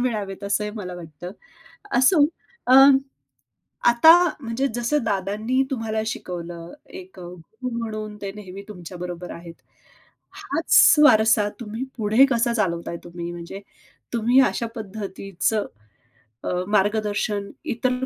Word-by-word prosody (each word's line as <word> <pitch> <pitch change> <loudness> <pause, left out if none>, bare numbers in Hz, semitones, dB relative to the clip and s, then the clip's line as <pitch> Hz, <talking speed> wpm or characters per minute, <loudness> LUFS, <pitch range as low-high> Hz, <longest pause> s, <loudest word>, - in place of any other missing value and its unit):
मिळावेत 210 -6 -3
असंही 210 +1 -1
मला 180 -3 -6
वाटतं. 170 0 -9 0.7
असो 285 +4 +5 0.4
अ, 255 - +5 1.2
आता 240 +7 +7 0.3
म्हणजे 250 +3 -1
जसं 240 +3 0
दादांनी 210 +5 -1
तुम्हाला 225 -3 -2
शिकवलं, 175 -4 -6 0.2
एक 185 0 -11
अ, 180 - -9
गुरु 180 +8 -8
म्हणून 215 -2 -5
ते 195 -1 -4
नेहमी 195 -2 -9
तुमच्या 180 -3 -9
बरोबर 175 0 -6
आहेत. 170 0 -10 0.8
हाच 330 -4 +4
वारसा 220 -5 +5
तुम्ही 225 +2 -5
पुढे 220 +4 +4
कसा 235 0 +1
चालवताय 170 -6 -2
तुम्ही? 175 0 -7
म्हणजे 175 +3 -8 0.5
तुम्ही 240 +3 +3
अशा 235 - -3
पद्धतीचं 205 -1 -3 0.8
अ, - - -3 0.2
मार्गदर्शन 205 0 0 0.2
इतर 250 +2 -1
210 Hz, 115 wpm, -23 LUFS, 180-235 Hz, 1.2 s, आता